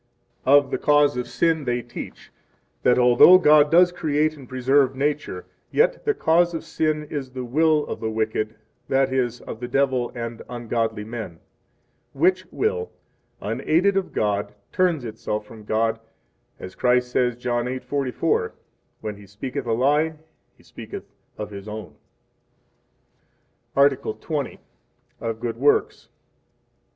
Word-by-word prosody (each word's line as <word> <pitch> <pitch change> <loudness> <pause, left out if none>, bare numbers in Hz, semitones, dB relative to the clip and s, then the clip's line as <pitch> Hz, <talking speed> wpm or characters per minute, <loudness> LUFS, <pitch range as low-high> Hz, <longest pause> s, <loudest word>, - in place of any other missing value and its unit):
Of 140 0 +5
the - - -1
Cause 145 -2 +4
of 125 0 -3
Sin 160 -3 +1
they 120 -1 -1
teach 120 - -9 0.5
that, 125 - +4
although 125 +9 +8
God 150 -4 +5
does 175 +2 +6
create 155 -2 0
and 135 -4 -13
preserve 130 +1 +2
nature, 145 +2 -2 0.2
yet 475 +3 +1
the 435 -1 +2
cause 170 - +2
of 165 - -4
sin 155 -1 -1
is 140 -4 -4
the 130 0 -6
will 155 +4 +2
of - - -5
the 110 - -2
wicked, 110 0 -2 0.3
that 135 0 +2
is, 125 -2 -1
of 110 - -8
the 120 - -5
devil 130 -2 +1
and 115 -1 -5
ungodly 115 -3 -2
men; 110 -6 -7 0.8
which 185 +6 +2
will, 455 +1 -1 0.5
unaided 185 +5 +1
of 195 -1 -1
God, 105 0 -1 0.2
turns 170 -8 +1
itself 105 -1 -4
from 110 0 -13
God, 110 +1 0 0.6
as 90 - -8
Christ 125 0 +1
says 125 -1 +1
John 120 0 -1
8:44: 130 - -1 0.5
When 105 -1 -5
he 100 -1 -14
speaketh 120 +6 -5
a 115 - +1
lie, 150 +6 +2 0.4
he - - -23
speaketh - - -9 0.3
of 105 0 -6
his 100 0 -9
own. 105 -2 -7 1.8
Article 140 -4 +3
XX. 145 +4 -4 0.6
Of 115 -1 -4
Good 115 -1 -3
Works. 145 +4 +1
130 Hz, 140 wpm, -23 LUFS, 115-150 Hz, 1.8 s, although